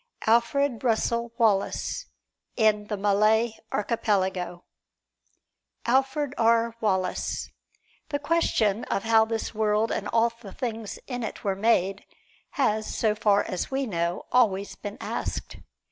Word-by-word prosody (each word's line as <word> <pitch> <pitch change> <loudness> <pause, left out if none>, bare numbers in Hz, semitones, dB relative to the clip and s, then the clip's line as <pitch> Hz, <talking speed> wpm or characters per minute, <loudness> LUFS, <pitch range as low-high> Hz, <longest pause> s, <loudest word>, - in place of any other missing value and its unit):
Alfred 235 +3 +2
Russel 235 0 +1
Wallace, 225 - +1 0.5
in 210 -2 +2
"The 210 - -3
Malay 215 +3 +3 0.2
Archipelago" 190 -5 -1 1.2
ALFRED 270 +3 +1
R. 230 0 +3
WALLACE 190 -4 -1 0.6
The 290 - 0
question 285 -9 +1
of 195 - -1
how 225 -1 +5
this 225 0 -3
world 215 +1 +1
and 205 - -2
all 230 +2 +2
the 195 -5 -10
things 225 -4 -4
in 245 -2 -4
it 220 - -5
were 195 -2 0
made, 195 -2 +1 0.5
has, 220 -6 0
so 220 -2 +1
far 210 -2 +3
as 185 - -3
we 270 0 -1
know, 170 -4 -2
always 200 -6 +2
been 205 0 -7
asked. - - -4
220 Hz, 125 wpm, -26 LUFS, 205-235 Hz, 1.2 s, how